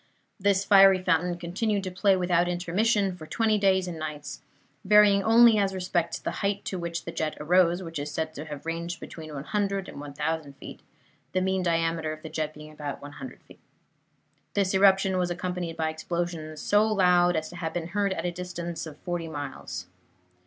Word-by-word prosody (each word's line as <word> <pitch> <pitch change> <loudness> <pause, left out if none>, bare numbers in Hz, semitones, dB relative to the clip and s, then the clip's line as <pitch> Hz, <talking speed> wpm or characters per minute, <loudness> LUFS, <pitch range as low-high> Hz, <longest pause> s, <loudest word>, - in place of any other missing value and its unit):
This 200 0 +2
fiery 195 -2 +7
fountain 175 0 +1
continued 195 +4 -1
to 185 - -4
play 195 +1 +3
without 175 -1 +2
intermission 190 +3 +1
for 155 -3 -11
twenty 220 +1 +1
days 190 -2 +3
and 170 -2 -6
nights, 150 -2 -6 0.4
varying 205 0 +6
only 225 0 +6
as 195 -1 0
respects 175 -2 -1
the - - -4
height 200 0 -1
to 185 - -3
which 170 -1 -4
the 170 - -4
jet 155 -1 -3
arose, 175 +3 +3
which 165 -3 -5
is 145 +1 -4
said 155 +1 -3
to 150 0 -7
have 150 -1 -8
ranged 170 +1 -4
between 155 -2 -9
100 195 +6 -2
and - - -8
1,000 150 +1 -3
feet, 135 - -11 0.5
the 185 - +1
mean 190 0 0
diameter 165 -2 0
of 155 0 -8
the 160 - -6
jet 155 -1 -3
being 150 0 -11
about 150 -2 -6
100 145 - -10
feet. - - -18 1.0
This 200 -2 +1
eruption 190 -1 +4
was 180 -1 0
accompanied 180 -1 -4
by 160 -1 0
explosions 160 -1 -4
so 205 +1 +3
loud 180 -4 +4
as 155 0 -1
to 175 - -10
have 165 -1 -4
been 170 -1 -3
heard 200 +1 0
at 180 -2 -3
a 175 - 0
distance 175 -2 -5
of 150 -2 -10
forty 175 -2 -3
miles. 140 - -6
175 Hz, 190 wpm, -27 LUFS, 160-190 Hz, 1.0 s, fiery